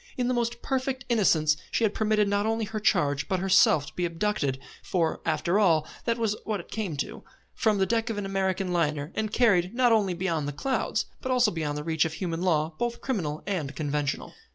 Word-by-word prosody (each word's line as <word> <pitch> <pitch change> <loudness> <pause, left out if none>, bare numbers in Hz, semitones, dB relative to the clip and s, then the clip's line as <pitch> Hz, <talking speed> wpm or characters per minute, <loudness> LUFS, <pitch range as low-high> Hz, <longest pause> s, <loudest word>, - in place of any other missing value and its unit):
In 250 -1 0
the 255 - +1
most 235 -1 -2
perfect 260 -1 -2
innocence 160 -10 +3
she - - 0
had 210 -2 +2
permitted 215 -1 +2
not 205 +1 +1
only 225 0 0
her 215 +1 -4
charge 145 -9 +1
but 190 -2 0
herself 185 -6 +4
to - - -11
be 180 - -3
abducted 165 -6 -1 0.2
for, 165 -3 -1
after 170 +5 +1
all, 165 -7 +3 0.2
that 230 0 +1
was 225 -3 0
what 215 -2 -2
it 170 - -11
came 195 -9 -3
to 215 +8 -4 0.3
from 215 -2 +1
the 190 - +3
deck 230 +2 0
of 225 - -3
an 205 - -3
American 190 -1 -1
liner, 150 -2 0
and 215 -1 -2
carried, 200 -5 +3
not 250 -1 +4
only 200 -5 +2
beyond 170 -5 -1
the 145 - -3
clouds, 260 - -1 0.2
but 260 - -2
also 250 -4 +4
beyond 150 -3 -3
the 150 - -4
reach 160 -1 +1
of 160 - -2
human 170 -1 -3
law, 160 -3 +1
both 240 0 -2
criminal 160 - -3
and 155 -8 -3
conventional. 145 -1 -2
190 Hz, 215 wpm, -27 LUFS, 160-220 Hz, 0.3 s, herself